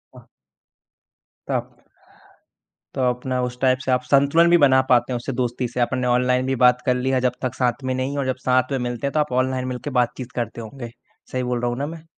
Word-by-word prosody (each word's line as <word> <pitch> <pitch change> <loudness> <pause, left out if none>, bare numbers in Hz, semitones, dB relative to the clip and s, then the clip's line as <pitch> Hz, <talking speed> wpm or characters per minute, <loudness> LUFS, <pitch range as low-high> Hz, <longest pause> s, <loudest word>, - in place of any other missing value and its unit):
हाँ। - - -15 1.2
ताप। - - -4 1.1
तो 135 - -1
अपना 125 +1 -2
उस 125 0 -5
टाइप 130 -1 +3
से 130 - 0
आप 125 0 +2
संतुलन 140 +6 +4
भी 175 - +6
बना 135 -4 +5
पाते 125 +1 +3
हो - - 0
उससे 120 +3 -5
दोस्ती 125 0 -2
से, 120 +1 -6
आपने 125 +1 0
ऑनलाइन 125 +1 +2
भी 135 0 0
बात 125 0 +4
कर 125 - +2
लिया 130 +1 0
जब - - 0
तक 130 -2 -2
साथ 125 +1 -1
में 130 0 -1
नहीं 130 +2 -2
हो - - -2
और 140 - -1
जब 130 - 0
साथ 130 +1 +2
में 135 - 0
मिलते 120 +3 -3
हैं - - -2
तो 155 - +1
आप 150 -3 0
ऑनलाइन 130 -1 -3
मिल 125 -1 -4
के - - -3
बातचीत 125 +1 -4
करते 120 -1 -4
होंगे। 120 +1 -8 0.4
सही 130 0 -2
बोल 125 -1 -2
रहा 120 - 0
हूँ 120 - -3
ना 140 - -2
मैं? 160 0 -9
130 Hz, 235 wpm, -22 LUFS, 125-130 Hz, 1.2 s, भी